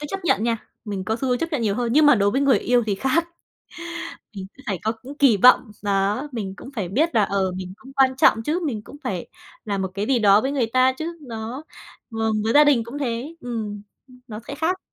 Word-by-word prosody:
cứ 295 Hz, -, -5 dB
chấp 390 Hz, -2 st, -5 dB
nhận 220 Hz, -, +2 dB
nha. 235 Hz, -1 st, +1 dB, 0.3 s
Mình 200 Hz, -3 st, -4 dB
có 220 Hz, +3 st, -1 dB
xu 260 Hz, +2 st, -3 dB
hướng 245 Hz, -, +1 dB
chấp 330 Hz, +3 st, -3 dB
nhận 275 Hz, -6 st, 0 dB
nhiều 205 Hz, -2 st, +1 dB
hơn, 235 Hz, +1 st, -1 dB
nhưng 300 Hz, +2 st, +5 dB
mà 290 Hz, -, +7 dB
đối 200 Hz, -1 st, +2 dB
với 265 Hz, -, 0 dB
người 280 Hz, -2 st, +4 dB
yêu 245 Hz, -1 st, +2 dB
thì 205 Hz, -, 0 dB
khác. 305 Hz, -, 0 dB, 1.1 s
Mình 190 Hz, -, -5 dB
cứ 270 Hz, -, -17 dB
phải 195 Hz, -4 st, -2 dB
có 220 Hz, -, 0 dB
những 285 Hz, +3 st, -10 dB
kỳ 260 Hz, -7 st, +5 dB
vọng, 250 Hz, +1 st, +5 dB
đó, 205 Hz, +7 st, 0 dB
mình 200 Hz, -5 st, -4 dB
cũng -, -, -10 dB
phải 195 Hz, -6 st, -3 dB
biết 310 Hz, -, +1 dB
là, 215 Hz, -, +5 dB
ờ, 195 Hz, -1 st, 0 dB
mình 185 Hz, 0 st, -6 dB
cũng 270 Hz, +1 st, -15 dB
quan 265 Hz, -1 st, +3 dB
trọng 225 Hz, -4 st, +4 dB
chứ, 315 Hz, +8 st, 0 dB
mình 225 Hz, -8 st, -2 dB
cũng 285 Hz, -, -12 dB
phải 180 Hz, -3 st, -3 dB, 0.4 s
là 200 Hz, -2 st, -2 dB
một 190 Hz, -1 st, -3 dB
cái 200 Hz, +2 st, -2 dB
gì 255 Hz, 0 st, +2 dB
đó 205 Hz, -1 st, +5 dB
với 270 Hz, -, -1 dB
người 260 Hz, -5 st, 0 dB
ta 255 Hz, +2 st, +3 dB
chứ. 330 Hz, +5 st, -6 dB
Đó, 230 Hz, +5 st, -6 dB, 0.5 s
vâng, 225 Hz, -1 st, -1 dB
với 225 Hz, +1 st, 0 dB
gia 295 Hz, +1 st, +8 dB
đình 275 Hz, -6 st, +3 dB
cũng 235 Hz, +5 st, -8 dB
thế, 260 Hz, +5 st, -3 dB
ừm, 220 Hz, -5 st, -5 dB, 0.3 s
ưm, 250 Hz, -1 st, -18 dB
nó 215 Hz, -2 st, -7 dB
sẽ 280 Hz, -, -5 dB
khác. 330 Hz, +5 st, 0 dB
235 Hz, 255 wpm, -23 LUFS, 210-275 Hz, 1.1 s, gia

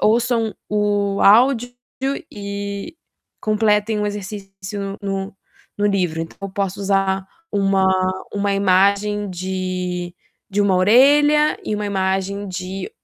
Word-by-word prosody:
ouçam 230 Hz, 0 st, +2 dB
o 205 Hz, -1 st, 0 dB
áudio 245 Hz, +3 st, +5 dB, 0.6 s
e 200 Hz, +7 st, -6 dB, 0.4 s
completem 215 Hz, 0 st, +1 dB
o 210 Hz, -, 0 dB
exercício 195 Hz, 0 st, -6 dB
no 195 Hz, -1 st, -3 dB, 0.4 s
no 205 Hz, -, 0 dB
livro, 180 Hz, -5 st, 0 dB
então 165 Hz, -, -9 dB
eu 195 Hz, -, -4 dB
posso 195 Hz, 0 st, -3 dB
usar 195 Hz, -1 st, +1 dB, 0.3 s
uma 195 Hz, -1 st, +2 dB, 0.5 s
uma 200 Hz, 0 st, 0 dB
imagem 200 Hz, +2 st, +2 dB
de 180 Hz, -1 st, -3 dB, 0.4 s
de 205 Hz, +1 st, 0 dB
uma 195 Hz, -2 st, +3 dB
orelha 290 Hz, +9 st, +5 dB
e 215 Hz, -, -1 dB
uma 210 Hz, 0 st, -3 dB
imagem 195 Hz, 0 st, -1 dB
de 185 Hz, +1 st, -5 dB
200 Hz, 115 wpm, -20 LUFS, 190-210 Hz, 0.6 s, áudio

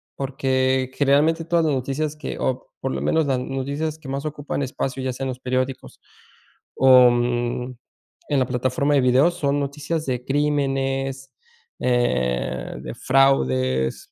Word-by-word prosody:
Porque 130 Hz, -1 st, 0 dB
generalmente 150 Hz, +4 st, +2 dB
todas 170 Hz, -1 st, +2 dB
las 150 Hz, -, +1 dB
noticias 140 Hz, +4 st, -2 dB
que 150 Hz, -, -6 dB
o 130 Hz, 0 st, -2 dB
por 135 Hz, -, -2 dB
lo -, -, -3 dB
menos 160 Hz, -2 st, +1 dB
las 130 Hz, -2 st, +1 dB
noticias 140 Hz, +4 st, -3 dB
que 140 Hz, -4 st, -10 dB
más 140 Hz, +2 st, -3 dB
ocupan 145 Hz, -1 st, -4 dB
espacio, 130 Hz, 0 st, -3 dB
ya 130 Hz, -1 st, -2 dB
sea 135 Hz, -, -6 dB
en 130 Hz, -, -2 dB
los 125 Hz, 0 st, -5 dB
periódicos 130 Hz, +1 st, -3 dB, 0.8 s
o 130 Hz, -2 st, +7 dB
en 120 Hz, +1 st, -1 dB, 0.6 s
la 130 Hz, -, +2 dB
plataforma 130 Hz, +3 st, 0 dB
de 135 Hz, -, +4 dB
videos, 130 Hz, +7 st, +3 dB
son 140 Hz, 0 st, 0 dB
noticias 150 Hz, +3 st, -3 dB
de 125 Hz, -1 st, -2 dB
crímenes, 135 Hz, -2 st, -1 dB, 0.6 s
eh, 65 Hz, -, 0 dB
de -, -, -6 dB
fraudes... 65 Hz, -, +1 dB
135 Hz, 145 wpm, -22 LUFS, 125-145 Hz, 0.8 s, o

